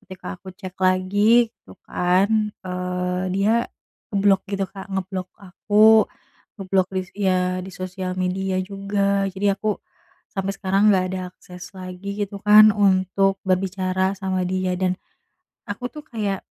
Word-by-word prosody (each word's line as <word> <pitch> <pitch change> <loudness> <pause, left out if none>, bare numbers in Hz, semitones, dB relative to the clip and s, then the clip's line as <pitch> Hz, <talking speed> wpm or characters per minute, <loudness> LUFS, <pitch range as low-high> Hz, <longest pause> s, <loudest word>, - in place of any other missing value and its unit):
ketika 185 0 -12
aku 190 - -12
cek 185 -2 -8
lagi 205 +5 +3
gitu - - -18
kan, 200 +4 +1
eee 180 0 -2
dia 220 +4 +2 0.4
ngeblok 195 -1 +3
gitu 195 -1 -1
Kak, 195 0 -10
ngeblok 190 -1 -3
aku, 210 +3 +4 0.5
ngeblok 190 -1 +1
dis 185 0 -3
iya 185 -2 +1
di 185 - -8
sosial 185 0 -5
media 185 +1 -1
juga, 200 0 0
jadi 195 +1 0
aku 215 -1 0 0.6
sampai 195 -1 -1
sekarang 195 0 +1
nggak 185 -2 +3
ada 185 - -3
akses 180 -1 -12
lagi 185 +2 -7 0.2
gitu 200 0 -10
kan 210 0 +8
untuk 195 -1 +2
berbicara 185 0 0
sama 190 -1 -1
dia, 185 0 -1
dan 185 0 0 0.7
aku 205 +5 -5
tuh 300 - -8
kayak, 205 -6 -2
190 Hz, 140 wpm, -22 LUFS, 185-200 Hz, 0.7 s, kan